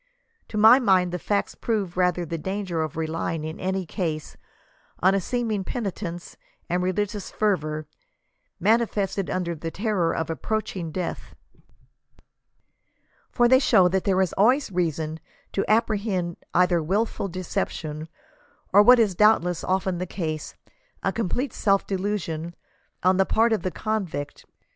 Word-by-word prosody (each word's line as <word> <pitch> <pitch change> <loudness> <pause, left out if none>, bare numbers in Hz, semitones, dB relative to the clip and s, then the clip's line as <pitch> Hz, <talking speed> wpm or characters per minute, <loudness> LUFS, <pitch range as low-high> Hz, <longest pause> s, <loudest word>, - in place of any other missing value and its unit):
To 215 - -5
my 220 +5 +8
mind 185 -7 +3
the 180 - -3
facts 200 +4 -1
prove 205 -6 -2
rather 180 -1 +1
the 165 0 -4
danger 190 -1 -3
of 155 -1 -4
relying 160 0 -2
in 160 +1 -6
any 190 0 -2
case 160 -3 -4 0.6
on 190 +2 +4
a 195 - +1
seeming 225 -2 -1
penitence 185 -5 -5 0.3
and 180 +1 0
religious 200 +2 -2
fervor, 155 -7 -1 0.7
manifested 205 -2 +1
under 175 -2 -1
the 165 +1 -5
terror 195 -3 0
of 160 0 -2
approaching 185 -2 -3
death, 180 +1 -5 2.0
for 240 -1 +4
they 260 +1 +6
show 220 -9 +5
that 190 +1 0
there 190 -2 +3
is 185 - 0
always 245 +5 +3
reason 160 -3 -1 0.3
to 195 - 0
apprehend 205 -6 +1
either 180 -1 +3
wilful 195 +4 -1
decep 185 0 -2
tion, 155 0 -6 0.7
or 205 - +8
what 245 +4 +8
is 220 -5 +3
doubtless 180 -4 +3
often 190 -1 0
the 180 - -3
case, 155 -4 -4 0.5
a 195 - +1
complete 230 +5 -2
self 195 -1 +2
delu 200 +2 -1
sion 165 0 -5 0.5
on 185 +1 +4
the 190 - +4
part 225 +1 +3
of 215 - 0
the 185 - -1
convict. 185 -9 -4
185 Hz, 145 wpm, -25 LUFS, 170-210 Hz, 2.0 s, my